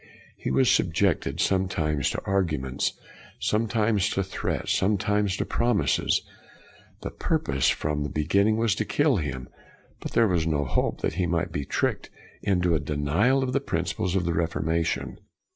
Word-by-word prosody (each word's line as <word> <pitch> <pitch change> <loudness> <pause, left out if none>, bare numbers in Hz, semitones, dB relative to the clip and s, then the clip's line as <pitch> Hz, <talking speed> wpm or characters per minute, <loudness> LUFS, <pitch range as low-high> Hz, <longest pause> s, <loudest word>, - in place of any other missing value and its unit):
He - - -4
was 130 - +3
subjected, 90 -1 +1
sometimes 80 -7 +1
to - - -4
arguments, 75 -10 0 0.4
sometimes 105 -2 +1
to 95 - 0
threats, 95 - -3
some 100 +2 +2
times 105 -1 0
to - - -1
promises. 120 -3 +1 0.8
The - - -5
purpose, 70 0 0
from 75 0 -1
the 75 - -2
beginning, 100 +8 +2
was 115 -2 +2
to 110 - -1
kill 145 -1 +2
him, 65 -6 -4 0.5
but - - -7
there 115 - +4
was 85 -5 +1
hope 75 -5 0
that - - -1
he 90 - +1
might 85 +2 -1
be 70 - -3
tricked - - -1 0.3
into 90 -4 +1
a 80 - +2
denial 75 - +1
of 130 -1 -2
the 140 - +1
principles 85 -3 -2
of 90 -3 +1
the 85 - 0
Reformation. 85 0 -1
90 Hz, 155 wpm, -26 LUFS, 75-105 Hz, 0.8 s, there